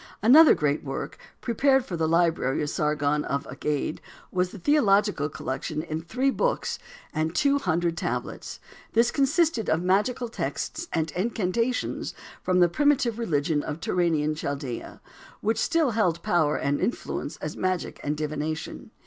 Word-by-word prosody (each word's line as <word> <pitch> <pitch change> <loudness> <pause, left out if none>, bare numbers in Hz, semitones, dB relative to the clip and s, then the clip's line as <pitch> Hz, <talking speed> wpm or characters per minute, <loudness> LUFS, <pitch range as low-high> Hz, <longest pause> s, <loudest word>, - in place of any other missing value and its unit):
Another 295 +8 +8
great 150 0 0
work, 135 -2 -5 0.2
prepared 265 +2 +2
for 180 - -4
the 160 -1 0
library 165 -4 +2
of 145 - -2
Sargon, 150 -1 0
of 140 0 -2
Agade, 145 +3 -3 0.3
was 180 -1 0
a - - -9
theological 205 - +3
collection 140 +2 -4
in 160 -1 -4
three 255 +12 0
books - - -1 0.3
and 160 0 -1
two 280 0 +3
hundred 170 -7 0
tablets. - - -4 0.3
This 235 +1 +4
consisted 285 - +2
of 160 +2 +1
magical 210 +7 +1
texts 320 +8 -4
and 160 -1 -1
incantations 230 +4 -1 0.3
from 180 -1 +2
the 175 - +7
primitive 255 - +2
religion 150 -7 0
of 150 +1 -5
Turanian 160 -4 +1
Chaldea, 140 -5 -5 0.4
which 220 +1 0
still 330 -3 +2
held 180 -7 +1
power 155 -4 +2
and 140 +1 0
influence 240 - -3
as - - -5
magic 185 -1 -2
and 150 +1 -1
divination. 155 0 -4
175 Hz, 145 wpm, -26 LUFS, 155-235 Hz, 0.4 s, Another